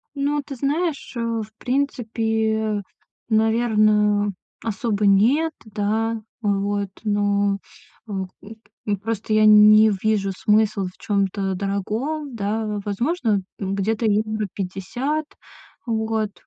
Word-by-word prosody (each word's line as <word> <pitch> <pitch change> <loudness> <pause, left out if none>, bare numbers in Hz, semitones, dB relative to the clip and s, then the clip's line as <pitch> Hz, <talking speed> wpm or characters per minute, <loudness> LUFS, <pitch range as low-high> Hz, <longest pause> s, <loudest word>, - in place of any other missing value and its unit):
Ну, 285 +1 0
ты 280 -2 -7
знаешь, 290 +4 -1
э, - - -3
в 230 -2 -2
принципе, 220 -5 -1 0.5
наверно, 215 -2 +3 0.3
особо 215 -1 -1
нет. 255 +12 +4
Да. 220 +2 -1 0.2
Вот, 200 -1 0
но 205 -1 +1 0.5
в, 195 -3 -4 0.6
м, 205 -1 0
просто 220 0 -3
я 215 0 +4
н 210 0 +8
не 215 +1 +7
вижу 200 -1 0
смысла 210 0 +2
в 180 - -12
чём-то 195 -1 -1
дорогом, 225 +9 -3
да. 210 0 -2
Возможно, 225 - 0 0.2
э, 195 - -3
где-то 200 +4 -1
евро 215 0 +1
50, 225 +11 -3 0.6
вот. 220 -2 -1
215 Hz, 110 wpm, -22 LUFS, 205-230 Hz, 0.6 s, н